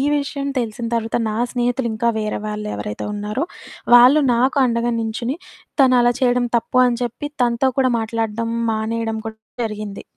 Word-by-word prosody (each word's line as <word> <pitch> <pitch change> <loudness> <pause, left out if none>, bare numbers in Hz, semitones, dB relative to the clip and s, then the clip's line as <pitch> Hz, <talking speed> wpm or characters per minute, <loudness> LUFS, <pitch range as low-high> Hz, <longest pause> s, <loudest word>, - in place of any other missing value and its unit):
విషయం 280 -1 -2
తెలిసిన 230 0 -3
తర్వాత 230 0 0
నా 215 - -3 0.2
స్నేహితులింకా 240 -2 -1
వేరే 215 -1 -2
వాళ్ళెవరైతే 210 - -4
ఉన్నారో, 210 +6 -2 0.5
వాళ్ళు 255 +5 +7
నాకు 255 +4 +2
అండగా 235 0 0
నించుని, 235 +4 -2 0.5
తను 255 -1 +5
అలా 240 0 +4
చెయ్యడం 245 -1 +2
తప్పు 255 +2 0
అని 240 -1 +1
చెప్పి 240 +5 -4
తనతో 240 +2 +2
కూడా 260 -1 +3
మాట్లాడడం 225 0 -2 0.2
మానేయడం 220 0 -2
కూడా 220 0 -8 0.3
జరిగింది 210 -2 -5
235 Hz, 140 wpm, -20 LUFS, 220-245 Hz, 0.5 s, వాళ్ళు